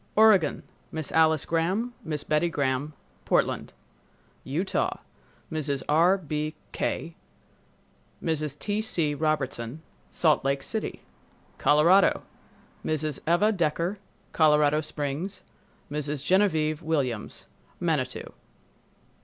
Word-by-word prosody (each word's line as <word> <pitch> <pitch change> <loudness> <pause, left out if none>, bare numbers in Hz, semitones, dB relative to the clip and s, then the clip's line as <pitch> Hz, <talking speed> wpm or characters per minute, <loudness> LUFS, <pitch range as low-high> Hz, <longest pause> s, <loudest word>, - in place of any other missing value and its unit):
Oregon—Miss 185 -6 +2
Alice 160 -2 +3
Gram, 190 +9 0
Miss 150 -3 -3
Betty 155 +3 +1
Gram, 140 -1 -1 0.3
Portland. - - +1 0.7
Utah—Mrs. 150 -2 -3
R. 170 +6 +4
B. 155 -2 -3 0.2
Quay, 165 - -2 1.1
Mrs. 155 -3 -2
T. 210 +4 -1
C. 165 -8 0
Robertson, 145 -3 -2 0.3
Salt 155 -4 +2
Lake 135 0 0
City. 220 -1 -4 0.6
Colorado—Mrs. 155 -2 +1
Eva 205 +6 +4
Decker, 175 +1 -1 0.3
Colorado 150 -1 +4
Springs, 155 +5 -4 0.5
Mrs. 150 -1 -3
Genevieve 160 -6 +2
Williams, 135 -9 -2 0.3
Manitou. - - -1
155 Hz, 85 wpm, -27 LUFS, 150-175 Hz, 1.1 s, R